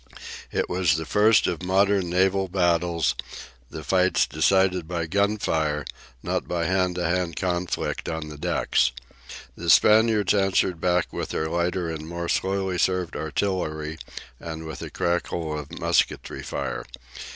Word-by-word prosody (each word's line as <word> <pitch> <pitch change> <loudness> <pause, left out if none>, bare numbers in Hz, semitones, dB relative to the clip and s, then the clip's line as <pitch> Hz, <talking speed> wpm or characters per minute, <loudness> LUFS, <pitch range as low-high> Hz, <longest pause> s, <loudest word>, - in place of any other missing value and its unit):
It - - 0
was 90 -2 +2
the 80 - -4
first 105 +6 +4
of 85 -3 -2
modern 95 0 +2
naval 95 +2 +2
battles, 85 -3 +1 0.6
the 80 - -7
fights 95 +5 +3
decided 95 -3 +2
by 85 -1 -2
gunfire, 80 -6 0 0.4
not - - -2
by 85 -1 -1
hand 90 0 +1
to 90 - -2
hand 85 0 0
conflict 90 -1 -2
on 80 -1 -4
the 75 -1 -9
decks. 65 -2 +1 0.6
The - - -4
Spaniards 110 -2 +5
answered 95 -3 +1
back 90 -1 +1
with - - -4
their 80 - -2
lighter 85 +1 -1
and 80 -1 -6
more 85 0 -4
slowly 95 -1 0
served 90 -2 0
artillery, 80 -3 -2 0.4
and 80 -1 -7
with 80 - -7
a - - -6
crackle 85 -2 -2
of 75 +3 -9
musketry 85 0 0
fire. - - -4
90 Hz, 140 wpm, -25 LUFS, 80-95 Hz, 0.6 s, Spaniards